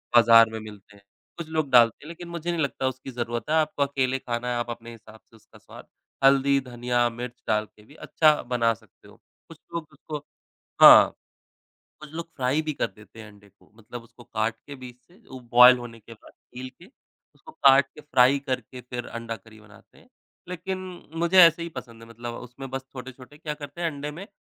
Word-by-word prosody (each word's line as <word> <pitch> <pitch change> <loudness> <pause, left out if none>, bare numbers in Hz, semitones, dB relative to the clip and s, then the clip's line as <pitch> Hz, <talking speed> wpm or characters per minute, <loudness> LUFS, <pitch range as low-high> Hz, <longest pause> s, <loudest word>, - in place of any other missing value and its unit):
बाज़ार 115 -1 +7
में 110 - -5
मिलते 105 -1 -13
हैं। 100 - -21 0.3
कुछ 170 - -6
लोग 155 -3 -1
डालते 120 -2 +5
हैं - - -12
लेकिन 170 +1 -9
मुझे 170 0 -6
नहीं 170 - -2
लगता 135 -2 -2
उसकी 130 +1 -6
ज़रूरत 120 0 -4
है। 155 - +2
आपको 155 -2 +1
अकेले 135 -2 -1
खाना 120 -1 -4
है, 120 - -1
आप 120 0 -3
अपने 120 0 -8
हिसाब 110 -1 -15
से 115 - -26
उसका 110 - -20
स्वाद - - -14 0.4
हल्दी, 140 0 +4
धनिया, 120 -1 -1
मिर्च 120 +1 -9
डाल 110 0 +1
के 105 - -23
भी 145 - -18
अच्छा 155 -1 +2
बना 115 -2 0
सकते 110 -3 -21
हो। - - -17 0.3
कुछ - - -14
लोग 165 -3 -4
उसको 150 -1 -8 0.6
हाँ, - - +10 0.9
कुछ 150 - -11
लोग 165 +1 -6
फ्राई 130 +3 0
भी 155 -1 -4
कर - - -1
देते 105 +2 -18
हैं 110 - -10
अंडे 100 -1 -19
को - - -28
मतलब 115 +2 -10
उसको 120 +1 -18
काट 110 0 -2
के 145 - -8
बीच 125 -1 -12
से 180 - -23
उ, 130 - -10
बॉयल 125 +1 +8
होने 120 -2 -10
के 115 +2 -14
बाद 110 - -19
छील 125 +1 -11
के, 175 - -15 0.5
उसको 315 - -15
काट 135 - +5
के 150 - -12
फ्राई 135 -1 +3
करके 130 -2 -5
फिर 120 -1 -5
अंडा 115 -1 -6
करी 110 -1 -17
बनाते 105 -1 -20
हैं। - - -21 0.4
लेकिन 185 +1 -5 0.4
मुझे 170 +3 +1
ऐसे 170 -1 +6
ही 170 - -6
पसंद 120 -6 -10
है। - - -14
मतलब 120 +1 -7
उसमें 125 +3 -10
बस 135 0 -5
छोटे-छोटे 130 +2 -11
क्या 150 -1 -5
करते 150 +2 -10
हैं 170 - 0
अंडे 145 0 -6
में 180 +7 -10
125 Hz, 210 wpm, -25 LUFS, 115-145 Hz, 0.9 s, हाँ